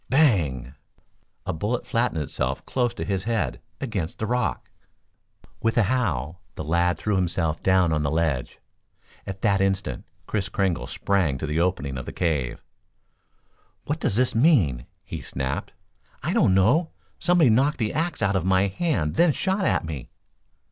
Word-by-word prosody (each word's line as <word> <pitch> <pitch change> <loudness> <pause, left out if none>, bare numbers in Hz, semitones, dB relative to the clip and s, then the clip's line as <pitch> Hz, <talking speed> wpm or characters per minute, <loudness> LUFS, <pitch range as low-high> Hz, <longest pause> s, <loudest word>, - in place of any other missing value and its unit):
Bang! 80 - +2 0.7
A - - -1
bullet 105 +9 -2
flattened 115 - 0
itself 65 -1 -3
close 125 -2 0
to - - -4
his 95 -1 -2
head, 115 -2 -1 0.2
against 100 -11 -3
the 110 - -2
rock. 125 +2 -1 0.9
With 115 +1 +1
a 115 - +6
howl, 95 - -1
the - - -5
lad 85 +2 +1
threw 105 +5 -1
himself 85 -3 0
down 95 -3 +3
on 75 - +1
the 70 - 0
ledge. 80 -5 -1 0.7
At 95 0 -6
that 100 -1 +3
instant 95 0 -1 0.2
Kris 100 +1 -2
Kringle 95 -6 0
sprang 90 -9 0
to 70 - -4
the 75 +2 -1
opening 75 -7 0
of 65 - -8
the - - -5
cave. 75 -8 -1 1.2
"What 150 +3 -2
does 100 - 0
this 125 +2 +3
mean?" 105 - +3 0.2
he - - -6
snapped. 65 0 -3 0.5
"I - - 0
don't 95 - +4
know. 135 - +3 0.3
Somebody 175 -7 +4
knocked 135 +7 +3
the 110 -4 -1
axe 165 -6 -1
out 100 0 +2
of 95 - +1
my 95 +2 +3
hand 95 - 0
then 170 -1 +5
shot 190 +5 0
at - - +1
me." 75 -6 -6
95 Hz, 160 wpm, -25 LUFS, 80-120 Hz, 1.2 s, a